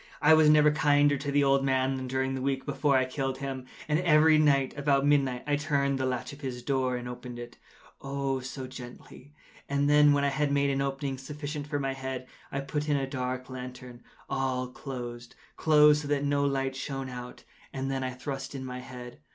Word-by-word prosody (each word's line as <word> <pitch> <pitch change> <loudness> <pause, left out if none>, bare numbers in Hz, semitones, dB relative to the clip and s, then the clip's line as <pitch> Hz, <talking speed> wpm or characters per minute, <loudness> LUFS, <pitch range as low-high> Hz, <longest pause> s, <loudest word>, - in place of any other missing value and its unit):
I 155 +2 +6
was 155 -1 +6
never 150 0 +6
kinder 145 -1 +3
to 140 +1 -3
the 145 0 +3
old 135 0 +3
man 130 0 +1
than 130 -1 -4
during 130 +1 -1
the 135 - -3
whole 130 - -4
week 135 -1 -1
before 140 -3 +2
I 130 - +2
killed 135 0 -3
him. 135 -2 -5 0.2
And 150 +1 +2
every 155 -2 +5
night, 140 -3 +3
about 140 -1 +2
midnight, 135 -4 +2
I 145 0 +1
turned 140 -2 0
the 130 - 0
latch 125 +1 -3
of 140 - -13
his 125 -3 -5
door 130 -1 0
and 125 0 -6
opened 125 0 -7
it—oh, 135 +3 -6
so 130 +1 -6
gently! 130 +2 -11 0.3
And 140 0 +1
then, 150 0 +6
when 145 0 +2
I 140 - +3
had 145 +1 0
made 140 0 +2
an 135 0 0
opening 135 -1 -2
sufficient 145 +1 -6
for 145 -1 -2
my 135 -1 -1
head, 130 -1 -5 0.3
I 140 - -2
put 150 +2 -3
in 145 - +3
a 135 - -1
dark 130 -1 -4
lantern, 125 -1 -8 0.3
all 130 -2 -1
closed, 125 -2 -7 0.2
closed, 150 -1 +5
that 145 -1 0
no 140 0 +1
light 135 -1 -1
shone 135 0 -4
out, 125 -1 -8 0.3
and 135 0 -3
then 135 -1 -2
I 130 - -1
thrust 135 +1 -6
in 130 -1 -5
my 125 0 -5
head. 125 -1 -10
135 Hz, 210 wpm, -28 LUFS, 130-145 Hz, 0.3 s, I